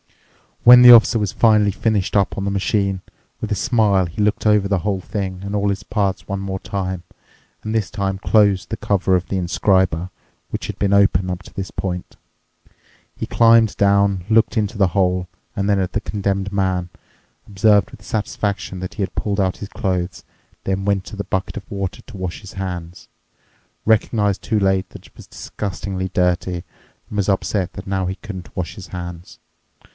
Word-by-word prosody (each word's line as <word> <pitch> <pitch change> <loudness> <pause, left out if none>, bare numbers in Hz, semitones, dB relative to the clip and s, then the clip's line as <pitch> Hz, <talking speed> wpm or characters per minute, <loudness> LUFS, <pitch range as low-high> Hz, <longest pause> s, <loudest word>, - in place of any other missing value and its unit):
When 125 +1 +10
the 125 - +11
Officer 115 0 +7
was 105 -4 -1
finally 105 -3 +4
finished 105 -1 -1
up 100 -2 +2
on 100 - -2
the 100 - -1
machine, 100 -1 0 0.4
with - - -5
a - - +2
smile 105 -6 +2
he 85 +5 -5
looked 105 +1 +1
over 105 -2 +4
the 100 -2 +1
whole 95 +1 -1
thing 95 -2 -4
and 100 +1 -4
all 100 0 +1
its 100 0 -3
parts 100 -2 -2
one 100 0 -3
more 95 -1 -4
time, 95 -3 -4 0.6
and 110 - -3
this 110 -3 0
time 95 -2 -2
closed 100 -2 +3
the 110 - -3
cover 95 -2 +1
of 90 0 -1
the 95 - -2
inscriber, 90 -1 +1 0.4
which - - -4
had - - -6
been 100 -1 +1
open 95 -2 +3
up 90 0 -4
to - - -15
this 95 -1 -5
point. 90 -2 -4 1.0
He - - -4
climbed 115 -2 +5
down, 100 -2 +3
looked 115 +2 +3
into 105 +1 -1
the 95 -3 +3
hole 90 -1 +1 0.3
and 100 0 -1
then 100 -1 +3
at 95 -1 -2
the 105 - 0
Condemned 100 -2 -2
Man, 95 -3 0 0.6
observed 100 0 +3
with 100 - -14
satisfaction 100 -3 -3
that 90 0 -6
he 100 - -1
had 95 - -5
pulled 100 -1 -1
out 95 -1 +1
his 100 - -7
clothes, 90 -3 -2 0.4
then 95 0 -2
went 100 -2 0
to 105 - -8
the 100 - -4
bucket 95 +3 -3
of 105 - -9
water 100 -2 -4
to 120 -5 -11
wash 90 -2 -5
his 100 - -11
hands, 90 -2 -6 0.8
recognized 105 -2 +2
too 110 -3 +1
late 95 -1 +1
that - - -13
it - - -27
was - - -13
disgustingly 95 -1 -5
dirty, 90 -1 0 0.5
and 105 - -6
was 100 -1 +1
upset 95 -1 0
that - - -9
now 95 -1 -1
he 95 - -3
couldn't 95 -4 -9
wash 90 -3 -4
his 95 -2 -10
hands. 85 -1 -8
100 Hz, 190 wpm, -20 LUFS, 95-105 Hz, 1.0 s, the